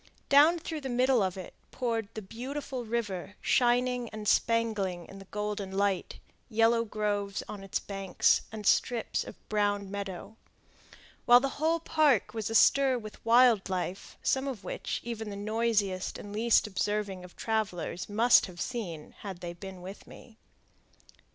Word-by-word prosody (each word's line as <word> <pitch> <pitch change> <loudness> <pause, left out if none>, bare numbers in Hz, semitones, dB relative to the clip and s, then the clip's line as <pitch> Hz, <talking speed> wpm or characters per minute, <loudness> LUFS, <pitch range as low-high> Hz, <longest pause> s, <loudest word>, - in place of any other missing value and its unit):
Down 300 +5 +6
through 320 -2 -5
the 265 - -5
middle 250 0 +3
of 190 -1 -1
it 185 - -8 0.2
poured 230 -4 -2
the 220 - -5
beautiful 255 +4 -5
river 205 -4 -3
shining 245 -1 +2
and 215 -1 -7
spangling 210 -7 +1
in 195 - -12
the 195 - -11
golden 210 -1 -4
light, 200 -2 0 0.3
yellow 230 +1 +3
groves 205 -2 -2
on 205 -2 -7
its 195 - -2
banks, 195 -2 +1
and 215 -1 -7
strips 240 +2 +1
of - - -10
brown 205 -2 0
meadow; 200 +1 -6 0.9
while 245 0 +9
the 275 +2 -1
whole 325 +1 +2
park 305 - +2
was 220 -2 -3
astir 260 +3 +5
with 215 -3 -10
wild 230 -3 +5
life, 185 0 -4
some 265 +1 +1
of 240 -8 -5
which - - -4
even 225 -2 -5
the 200 - -6
noisiest 205 -3 0
and 205 - -9
least 225 +2 +3
observing 205 -2 -2
of 180 - -13
travelers 195 -6 -2
must 225 +3 +5
have 175 -2 -12
seen 180 -12 -5
had 195 -4 -7
they 175 -1 -5
been 185 +1 -9
with 190 +2 -9
me. 230 - -14
215 Hz, 155 wpm, -29 LUFS, 195-240 Hz, 0.9 s, while